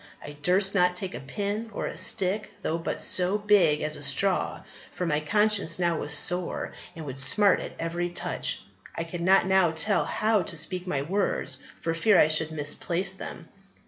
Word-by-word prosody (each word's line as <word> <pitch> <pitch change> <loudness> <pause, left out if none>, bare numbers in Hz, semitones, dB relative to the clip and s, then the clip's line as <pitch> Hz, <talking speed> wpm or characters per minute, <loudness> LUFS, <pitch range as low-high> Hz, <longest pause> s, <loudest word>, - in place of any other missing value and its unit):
I 145 - -7
durst 180 +7 +1
not 180 -2 +2
take 185 0 -4
a - - -6
pin 205 +10 -4
or - - -4
a - - -5
stick, 205 +1 0
though 165 +1 -1
but 165 - -3
so 185 +3 +3
big 205 -8 +3
as 155 0 -1
a - - -11
straw, 190 +6 +1 0.3
for 180 - -5
my 150 -3 0
conscience 205 +2 +1
now 170 -2 0
was 150 - -5
sore 175 +4 0 0.2
and 160 -2 -8
would 135 -1 -4
smart 190 +10 +4
at - - -7
every 170 +1 -3
touch. 175 - -1 0.3
I 165 - -3
could 170 +1 -7
not 190 +3 +4
now 190 -2 +3
tell 165 +6 +1
how 215 -1 +1
to 170 - -5
speak 180 +4 -2
my 140 -5 -1
words 195 +6 -1 0.2
for 165 - -1
fear 195 +4 +3
I 155 - +5
should 155 0 +2
misplace 170 +5 -1
them." 190 - -9
180 Hz, 190 wpm, -26 LUFS, 160-200 Hz, 0.3 s, I